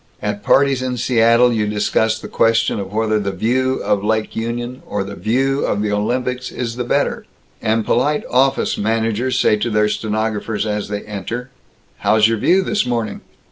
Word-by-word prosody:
At 105 -1 -3
parties 135 +4 +3
in 130 -1 -2
Seattle, 120 0 +4
you 105 -2 0
discuss 110 +1 +1
the - - -9
question 115 -1 +2
of 100 -1 -6
whether 110 0 +1
the 100 -1 -2
View 125 +7 0
of 100 -1 0
Lake 110 0 -1
Union 120 +2 -4
or 100 -1 -2
the 100 +1 -7
View 135 +6 0
of 100 - 0
the 105 - -1
Olympics 125 +4 -1
is 115 -2 -4
the 125 - -2
better, 120 - -1 0.3
and 110 0 0
polite 145 +4 +1
office 135 +2 +1
managers 115 +3 0
say 105 - +3
to 115 +3 -1
their 105 -1 +2
stenographers 110 0 -2
as 105 -1 -2
they 105 0 -4
enter, 110 +5 -6 0.5
"How's 110 0 +4
your 115 -1 0
View 190 - +3
this 210 +3 0
morning?" 115 -4 -2
115 Hz, 180 wpm, -19 LUFS, 105-125 Hz, 0.5 s, Seattle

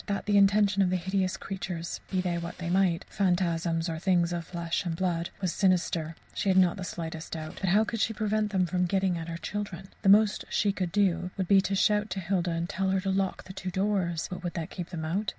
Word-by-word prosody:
That 200 -1 -2
the 205 - +2
intention 200 0 +4
of 185 - +3
these 185 -1 0
hideous 190 -1 0
creatures 180 -3 -5
be 185 -1 0
they 175 -2 -1
what 170 +1 -6
they 175 -1 -3
might 185 -3 +2
phantasms 175 -4 0
or 160 -1 -3
things 175 -1 +2
of 170 -1 -3
flesh 170 0 -2
and 170 -3 -2
blood 170 -1 -1
was 185 -3 0
sinister, 175 -4 +1 0.2
she 200 - -1
had 190 - +4
not 185 0 +4
the 190 - -5
slightest 160 -2 -6
doubt; 155 -1 -6
but 190 - +1
how 205 +4 +5
could 225 +1 -3
she 225 - +2
prevent 215 0 0
them 190 -2 +2 0.2
getting 190 -1 +1
at 165 - -6
her 165 0 -4
children? 195 -1 -5
The 195 - +3
most 210 +1 +5
she 205 - +2
could 185 -3 -3
do 180 -3 +1
would 190 -2 -1
be 195 0 +6
to 195 +1 -1
shout 210 +2 +2
to 195 - -3
Hilda 180 -1 0
and 165 0 -1
tell 190 0 -1
her 190 0 +2
to 195 0 -1
lock 190 -1 -1
the 190 - -10
two 190 -1 -5
doors. 185 -3 0
But 180 0 -7
would 175 - -4
that 160 -2 -4
keep 175 -2 -6
them 160 -3 -4
out? 190 +6 -1
185 Hz, 240 wpm, -28 LUFS, 170-195 Hz, 0.2 s, be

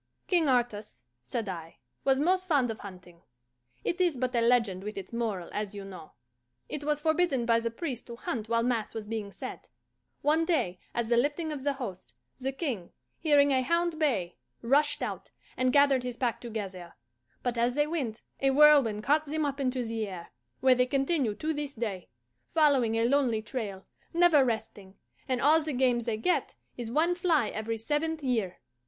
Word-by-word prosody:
"King 345 -3 +3
Artus," 235 - -1 0.2
said 205 - -4
I, 165 -3 -7 0.3
"was 270 -1 +3
most 370 +4 +2
fond 275 -8 +2
of 220 - -8
hunting." 180 -3 -12 0.6
(It 355 - -1
is 345 -7 +2
but 255 0 -1
a 235 - +2
legend 230 -6 +2
with 210 0 -6
its 195 +3 -7
moral, 215 -7 -2
as 210 -1 -3
you 200 -1 -6
know.) 185 -5 -10 0.5
"It 295 - -5
was 295 0 -1
forbidden 315 -6 +2
by 230 -1 +4
the 230 0 -2
priests 250 0 -5
to 235 - -7
hunt 225 -2 -4
while 230 0 +2
mass 235 -3 -1
was 220 -2 -4
being 210 -2 -4
said. - - -8 0.6
One 310 +3 +3
day, 245 - 0 0.2
at 235 -1 0
the 235 0 +3
lifting 295 +5 0
of 285 -3 -5
the 285 0 +1
host, 190 - -7 0.2
the 265 +1 -2
King, 260 - -4 0.3
hearing 290 -3 +4
a 260 -1 +3
hound 335 +4 0
bay, 205 - 0 0.3
rushed 290 +5 +2
out, - - -5 0.3
and 255 0 +2
gathered 280 -1 +5
his 245 -1 -5
pack 245 -3 -1
together; 195 -7 -6 0.5
but 245 -1 -1
as 240 +1 +1
they 295 0 +3
went, 275 -9 -3 0.2
a 270 - +3
whirlwind 270 -7 +5
caught 300 +5 +3
them 310 +1 -1
up 280 0 -3
into 255 -2 -1
the 225 -1 -2
air, 180 -3 -8 0.3
where 260 -1 +6
they 250 0 +2
continue 270 -4 +1
to 310 +8 -2
this 290 -1 -4
day, 210 -6 -4 0.5
following 275 -8 +4
a 225 0 +2
lonely 245 -4 +2
trail, 210 -5 -5 0.3
never 340 -5 +6
resting, 215 -5 -4 0.3
and 255 -2 0
all 310 +3 +5
the 305 -1 -3
game 250 -1 +2
they 230 -2 -2
get 355 +12 0 0.2
is 240 -2 -5
one 320 +8 +2
fly 330 - +2
every 220 +1 -3
seventh 300 +6 -2
year. 225 -8 -1
250 Hz, 185 wpm, -29 LUFS, 220-295 Hz, 0.6 s, where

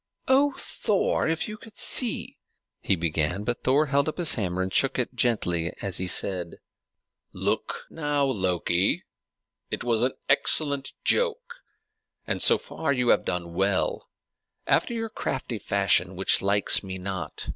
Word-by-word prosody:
"Oh, 275 +1 +3
Thor! 200 -5 -1
if 160 0 -1
you 215 0 -7
could 220 -1 -15
see" 245 -4 +3 0.4
he 95 - +1
began; 80 +2 -1
but 120 +2 -3
Thor 140 +4 +3
held 140 +1 +1
up - - -7
his 170 -5 +6
hammer 95 -4 -2
and 95 - -5
shook - - +2
it - - -2
gently 90 -8 0
as 95 -3 -2
he 95 - -1
said, 90 -2 +1 0.8
"Look - - -2
now, 145 -3 0
Loki: 95 -5 0 0.7
it - - -4
was 115 -2 +1
an 130 +2 +1
excellent 140 -3 +1
joke, 485 0 0 0.7
and - - -2
so - - +6
far 150 - -4
you 125 -3 0
have - - +4
done 85 -1 -3
well, 95 +2 -1 0.6
after - - +1
your 225 0 -3
crafty 125 - -4
fashion, 100 -2 +1
which 95 +2 +3
likes 100 +1 +2
me 95 -1 -6
not. 95 0 -4
110 Hz, 150 wpm, -25 LUFS, 95-150 Hz, 0.8 s, his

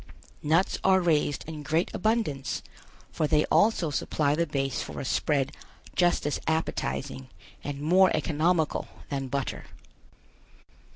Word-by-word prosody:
Nuts 165 +5 +2
are 190 0 +5
raised 155 -5 +1
in 155 -2 -6
great 160 +4 0
abundance, 185 - -1 0.5
for 155 -3 0
they 150 +1 +3
also 205 -7 +3
supply 145 0 0
the 170 +2 +1
base 135 -1 -1
for - - -6
a - - -4
spread 140 0 0 0.4
just 175 -4 +2
as 145 - -1
appetizing 70 - -2 0.3
and 140 0 -4
more 185 +5 +5
economical 160 +1 +1 0.2
than 135 -2 -2
butter. 135 0 -3
155 Hz, 125 wpm, -27 LUFS, 140-175 Hz, 0.5 s, are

